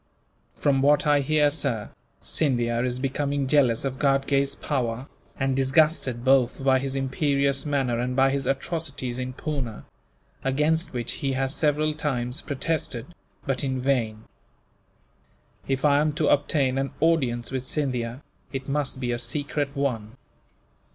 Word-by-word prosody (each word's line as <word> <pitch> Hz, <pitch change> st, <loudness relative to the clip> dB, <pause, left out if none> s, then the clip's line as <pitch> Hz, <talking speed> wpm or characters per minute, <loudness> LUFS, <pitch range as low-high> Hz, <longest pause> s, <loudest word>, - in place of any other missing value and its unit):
"From 135 Hz, -2 st, +2 dB
what 145 Hz, +3 st, +4 dB
I 145 Hz, -1 st, +4 dB
hear, 150 Hz, +1 st, +3 dB
sir, 135 Hz, -8 st, -2 dB, 0.3 s
Scindia 120 Hz, -5 st, +1 dB
is 125 Hz, -1 st, -1 dB
becoming 140 Hz, +1 st, -1 dB
jealous 130 Hz, -3 st, +3 dB
of 130 Hz, 0 st, -3 dB
Ghatgay's 140 Hz, 0 st, +2 dB
power, 125 Hz, -2 st, -2 dB, 0.3 s
and 135 Hz, -1 st, +1 dB
disgusted 135 Hz, -2 st, +2 dB
both 130 Hz, 0 st, +3 dB
by 135 Hz, -1 st, +4 dB
his 135 Hz, 0 st, -3 dB
imperious 140 Hz, +1 st, +1 dB
manner 135 Hz, -5 st, 0 dB
and 125 Hz, +1 st, -1 dB
by 135 Hz, 0 st, +4 dB
his 135 Hz, -2 st, -1 dB
atrocities 135 Hz, -3 st, -2 dB
in 130 Hz, 0 st, -4 dB
Poona 130 Hz, -6 st, -4 dB, 0.6 s
against 150 Hz, +6 st, +1 dB
which 120 Hz, -2 st, -2 dB
he 135 Hz, -1 st, 0 dB
has 135 Hz, +1 st, 0 dB
several 155 Hz, 0 st, +1 dB
times 130 Hz, -5 st, -2 dB
protested, 140 Hz, -1 st, -2 dB, 0.3 s
but 135 Hz, -2 st, 0 dB
in 130 Hz, -1 st, -1 dB
vain. 120 Hz, -5 st, 0 dB, 1.4 s
If 135 Hz, +1 st, 0 dB
I 145 Hz, -1 st, +5 dB
am 150 Hz, 0 st, +1 dB
to 155 Hz, -1 st, +1 dB
obtain 140 Hz, -2 st, +2 dB
an 135 Hz, 0 st, -2 dB
audience 130 Hz, -8 st, +1 dB
with 130 Hz, -2 st, -2 dB
Scindia, 130 Hz, -3 st, -2 dB, 0.3 s
it 135 Hz, -1 st, -5 dB
must 140 Hz, -2 st, -1 dB
be 125 Hz, -2 st, -1 dB
a 120 Hz, -, -1 dB
secret 145 Hz, +1 st, -2 dB
one." 120 Hz, -6 st, -2 dB
135 Hz, 145 wpm, -25 LUFS, 125-145 Hz, 1.4 s, I